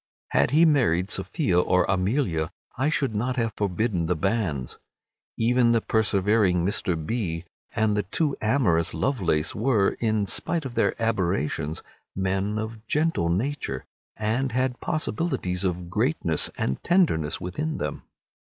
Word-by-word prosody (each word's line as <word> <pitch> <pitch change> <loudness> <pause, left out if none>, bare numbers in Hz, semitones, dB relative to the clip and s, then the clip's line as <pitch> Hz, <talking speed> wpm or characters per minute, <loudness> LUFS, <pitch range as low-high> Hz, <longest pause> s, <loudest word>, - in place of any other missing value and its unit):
Had 70 - +3
he 155 +5 +5
married 105 - +2
Sophia 130 - +1
or 90 +1 +3
Amelia 95 - 0 0.3
I 135 +5 +1
should 135 -6 0
not 125 +5 -1
have 115 -3 -1
forbidden 100 -3 0
the 90 - +1
banns. 85 - -1 0.6
Even 120 +1 +3
the 115 - +4
persevering 100 -4 +2
Mr. 95 -2 +1
B—— 90 -7 -2 0.3
and 110 -1 +2
the 105 - +2
too 140 - -1
amorous 105 - +2
Lovelace 85 - 0
were, 110 -4 +2
in 110 -3 +1
spite 165 - -2
of 130 - -5
their - - +1
aberrations, 90 -8 -1 0.3
men 95 +2 -1
of 110 0 -5
gentle 150 - +1
nature, 95 - -2 0.3
and 115 +5 -1
had 130 0 0
possibilities 155 - -2
of 90 -2 -2
greatness 105 - +1
and 65 - -2
tenderness 165 - +2
within 150 - -3
them. - - -4
105 Hz, 135 wpm, -25 LUFS, 90-125 Hz, 0.6 s, he